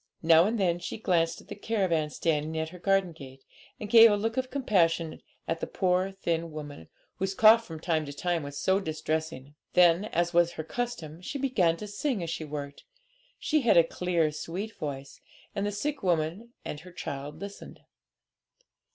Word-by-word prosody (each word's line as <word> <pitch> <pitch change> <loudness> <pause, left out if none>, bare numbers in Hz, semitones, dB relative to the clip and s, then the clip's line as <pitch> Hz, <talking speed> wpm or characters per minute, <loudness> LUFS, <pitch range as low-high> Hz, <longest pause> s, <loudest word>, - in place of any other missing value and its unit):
Now 165 +1 +6
and 220 +2 -1
then 175 -3 +1
she - - -5
glanced 170 -6 0
at - - -20
the - - -6
caravan 190 -8 0
standing 155 0 -1
at 160 0 -2
her 180 +2 -12
garden 195 -1 +2
gate, 135 -4 -12 0.4
and 210 - -5
gave 230 +1 +9
a 205 - +2
look 225 +2 -2
of 260 0 -1
compassion 170 - +1 0.3
at 165 - -1
the - - -3
poor 185 +1 +1
thin 170 -3 -2
woman, 145 - -8 0.3
whose 195 0 -2
cough 225 +2 +7
from 160 -2 -7
time 160 -2 -1
to - - -5
time 170 +3 -1
was 145 0 -7
so 190 +5 +2
distressing. 155 -4 -3 0.2
Then, 180 +2 +5
as 175 -4 -1
was 170 0 +3
her 160 - -5
custom, 170 -6 -5
she 280 - -5
began 205 -12 +1
to 210 - -7
sing 210 0 -2
as 165 - -4
she 165 - -4
worked; 145 -1 -7 0.5
she 310 -1 +1
had 235 -7 +4
a 170 - +8
clear, 170 -2 0
sweet 185 +8 -5
voice, 140 -2 -6 0.3
and 205 0 -1
the - - -1
sick 280 +8 -3
woman 175 +5 -1 0.2
and 150 - -5
her 180 +4 -13
child 140 -3 -6
listened. 200 0 -9
175 Hz, 185 wpm, -28 LUFS, 160-205 Hz, 0.5 s, gave